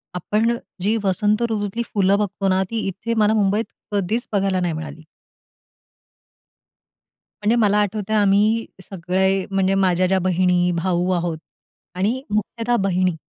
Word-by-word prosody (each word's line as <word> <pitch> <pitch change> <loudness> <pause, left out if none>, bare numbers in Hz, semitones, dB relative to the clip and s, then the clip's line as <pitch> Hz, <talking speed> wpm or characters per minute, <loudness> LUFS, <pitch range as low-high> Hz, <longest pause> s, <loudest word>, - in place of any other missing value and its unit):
आपण 220 +6 0 0.2
जी 210 +4 +1
वसंत 205 +3 +1
ऋतूतली 210 +2 -2
फुलं 200 -1 +3
बघतो 205 -1 -2
ना, 190 0 +2
ती 225 -3 -2
इथे 205 +5 -3
मला 215 0 +3
मुंबईत 210 +1 +1 0.3
कधीच 205 +4 -1
बघायला 195 -2 +1
नाही 175 -2 -1
मिळाली. 160 0 -7 2.4
म्हणजे 215 +3 +3
मला 210 -3 +3
आठवतंय, 210 +1 -1
आम्ही 210 +2 +3 0.2
सगळे 190 +1 0
म्हणजे 195 0 +1
माझ्या 185 -1 +2
ज्या 190 +1 +2
बहिणी, 180 -1 +2
भाऊ 175 +1 0
आहोत 170 -2 -1 0.6
आणि 215 +8 0
मुख्यतः 230 +3 -1
बहिणी 185 -2 +1
195 Hz, 130 wpm, -21 LUFS, 185-215 Hz, 2.4 s, फुलं